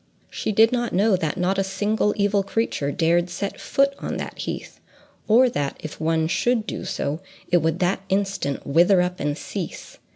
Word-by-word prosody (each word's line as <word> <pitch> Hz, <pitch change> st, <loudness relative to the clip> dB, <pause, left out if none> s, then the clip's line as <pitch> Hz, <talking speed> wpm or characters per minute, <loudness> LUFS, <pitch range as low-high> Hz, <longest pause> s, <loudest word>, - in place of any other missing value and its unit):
She -, -, -2 dB
did 220 Hz, +2 st, +5 dB
not 240 Hz, -1 st, -1 dB
know 205 Hz, +2 st, +4 dB
that 160 Hz, -2 st, -2 dB
not 185 Hz, +2 st, +1 dB
a -, -, +2 dB
single 205 Hz, +2 st, 0 dB
evil 200 Hz, 0 st, +2 dB
creature 195 Hz, -8 st, -1 dB
dared 170 Hz, +3 st, +2 dB
set 195 Hz, +3 st, -4 dB
foot 275 Hz, 0 st, +2 dB
on -, -, -4 dB
that -, -, -6 dB
heath, -, -, -5 dB, 0.5 s
or 240 Hz, +4 st, +6 dB
that, 140 Hz, -, -2 dB
if 155 Hz, 0 st, -8 dB
one 160 Hz, 0 st, +1 dB
should 230 Hz, +5 st, +1 dB
do -, -, -5 dB
so, 145 Hz, +3 st, -2 dB, 0.3 s
it 175 Hz, -, +4 dB
would 160 Hz, 0 st, +1 dB
that 180 Hz, +1 st, +1 dB
instant 195 Hz, -7 st, -1 dB
wither 175 Hz, +6 st, +4 dB
up 180 Hz, 0 st, -3 dB
and 145 Hz, +1 st, -1 dB
cease. 185 Hz, -2 st, -6 dB
190 Hz, 185 wpm, -23 LUFS, 165-210 Hz, 0.5 s, or